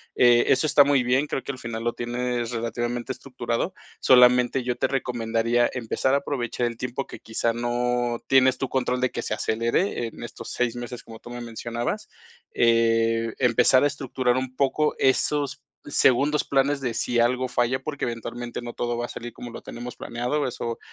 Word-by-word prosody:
Eh, 120 -1 +5
eso 155 - +3
está 145 -1 +6
muy 140 -1 +3
bien, 130 +4 +2
creo 135 - -3
que - - -3
al 130 - -10
final 115 -2 -5
lo 120 0 0
tienes 120 0 -2
relativamente 120 +2 -3
estructurado. 130 +4 -3 0.3
Solamente 125 0 +5
yo 125 0 -1
te - - +1
recomendaría 120 -2 0
empezar 125 +2 -1
a - - +5
aprovechar 125 -4 -2
el 115 -1 -6
tiempo 125 +3 -4
que - - -10
quizá 115 +1 -1
no 120 0 0
tienes 130 -1 +5
tu 135 - -2
control 125 -1 0
de 130 - +1
que - - -3
se - - -3
acelere, 115 - 0
en 115 - -10
estos 120 - -8
6 125 -1 -1
meses, 120 0 -7
como 115 -1 -11
tú - - -12
me 120 0 -6
mencionabas. 120 0 -4 0.4
Eh, 115 -1 +2
empezar 125 +1 +4
a - - +5
estructurar 130 -3 -1
un 130 0 -3
poco 150 +2 +2
esos 140 +1 +1 0.3
segundos 145 +2 +3
planes 140 +1 +1
de 120 -3 -2
si 120 +1 0
algo 125 +2 +2
falla, 120 +1 +1
porque 145 +2 -4
eventualmente 120 +1 -5
no 120 0 -6
todo 120 0 -2
va 120 - -2
a - - -6
salir 120 -1 -8
como 120 +1 -9
lo - - -8
tenemos 120 +1 -8
planeado, 125 +5 -2
eso, 115 -2 -4
120 Hz, 185 wpm, -25 LUFS, 120-130 Hz, 0.4 s, está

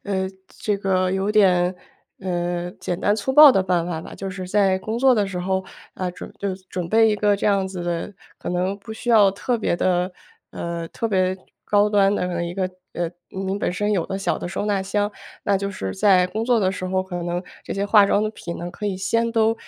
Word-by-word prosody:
呃， 190 -2 -1 0.2
这 210 -1 -2
个 185 -2 +1
有 190 +2 0
点， 185 -4 +4 0.5
呃， 175 -1 -2
简 175 - -3
单 205 - +2
粗 220 +5 -2
暴 295 0 +10
的 195 - +2
办 175 -2 0
法 165 -3 -3
吧。 - - -10
就 195 0 -5
是 185 -1 -6
在 195 -2 +3
工 220 +4 -3
作 265 0 +5
的 210 -3 +1
时 190 -2 -5
候， 190 +1 -1 0.3
呃， 185 -1 -3
准 180 - -10
就 200 -2 -2 0.2
准 180 -2 -3
备 225 +3 +5
一 - - +2
个 205 0 +2
这 - - -2
样 195 -2 +2
子 185 -2 -6
的 175 +3 -3 0.2
可 - - -6
能 185 +3 -1
不 220 +2 -9
需 240 +2 -3
要 210 -4 +6
特 235 +5 -2
别 190 - 0
地 180 +1 +1 0.4
呃， 170 -1 -5
特 230 - -3
别 185 -3 +1 0.3
高 205 0 +3
端 200 -1 +4
的 180 -3 -1
一 170 0 -5
个 185 -1 -1 0.2
呃， 175 -1 -1 0.2
您 190 +1 -3
本 - - 0
身 205 +4 -1
有 180 -5 0
的 195 - -3
小 195 - -1
的 - - -5
收 205 - -3
纳 205 -2 0
箱。 205 +2 0 0.3
那 200 - +3
就 200 0 -3
是 95 - -5
在 185 -3 +4
工 210 +5 -3
作 245 -1 +3
的 190 -3 +1
时 185 0 -4
候， 185 0 0
可 180 -2 -5
能 175 +1 -2 0.2
这 - - -5
些 200 +1 -1
化 205 -1 +6
妆 205 +1 +2
的 215 - -1
品 170 -5 -7
呢 175 +1 -5
可 210 - -5
以 190 -2 -1
先 230 +5 0
都 225 -1 +3
190 Hz, 250 characters per minute, -22 LUFS, 180-205 Hz, 0.5 s, 暴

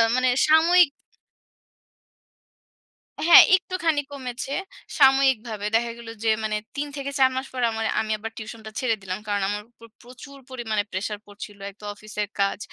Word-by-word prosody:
মানে 255 0 +2 0.2
সাময়িক 330 +2 +5 2.4
হ্যাঁ, 345 - +11
একটুখানি 345 -5 -1
কমেছে, 260 -1 -6 0.5
সাময়িকভাবে। 265 -6 +3
দেখা 235 +1 +1
গেলো 235 -1 -9
যে 225 - +2
মানে 215 -1 -1 0.2
৩ 290 +1 -3
থেকে 280 0 -4
৪ 260 -1 +6
মাস 260 +1 -2
পর 255 - -3
আমা 225 0 -4 0.2
আমি 220 - -4
আবার 225 +1 -7
tuition 220 +1 -8
টা - - -8
ছেড়ে 255 -4 +1
দিলাম। 185 0 -5
কারণ 205 -1 0
আমার 205 0 -3
উপর 230 -1 -17
প্রচুর 255 +3 -13
পরিমাণে 225 -5 -2
প্রেশার 205 +2 -4
পড়ছিলো। 205 0 -11
এক 195 - -16
তো - - -9
অফিসের 210 0 -5
কাজ। 200 0 +1
235 Hz, 155 wpm, -24 LUFS, 210-270 Hz, 2.4 s, হ্যাঁ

